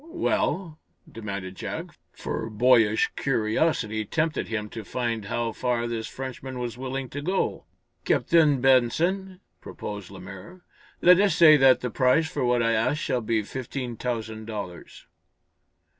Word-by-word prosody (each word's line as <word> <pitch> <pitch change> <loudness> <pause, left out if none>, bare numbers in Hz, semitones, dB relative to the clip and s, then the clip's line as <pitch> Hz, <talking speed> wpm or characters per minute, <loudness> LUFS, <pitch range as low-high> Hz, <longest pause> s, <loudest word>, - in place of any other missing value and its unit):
"Well?" 185 - -1 0.3
demanded 100 -4 -6
Jack, - - -6 0.2
for 110 - -5
boyish 110 -1 +3
curiosity 110 -2 0
tempted 155 +9 -1
him 105 -1 -3
to 115 - -7
find 115 -1 -3
how 115 +2 -2
far 120 0 -1
this 115 -1 -3
Frenchman 130 0 -7
was 120 -2 -4
willing 130 +1 -4
to 145 - -6
go. 185 +6 -1 0.4
"Captain 155 -6 +3
Benson," 170 +10 +2 0.2
proposed 105 -3 -7
Lemaire, 95 - -11 0.4
"let 180 +1 +7
us 200 -1 +3
say 155 -3 +8
that 135 -2 +5
the 125 - -3
price 130 +7 +3
for 155 - -3
what 120 -1 +2
I 115 - +2
ask 115 +7 +1
shall 125 -4 -1
be 110 -1 0
fifteen 125 +1 -5
thousand 110 -2 -4
dollars." 100 -6 -8
125 Hz, 140 wpm, -26 LUFS, 110-145 Hz, 0.4 s, say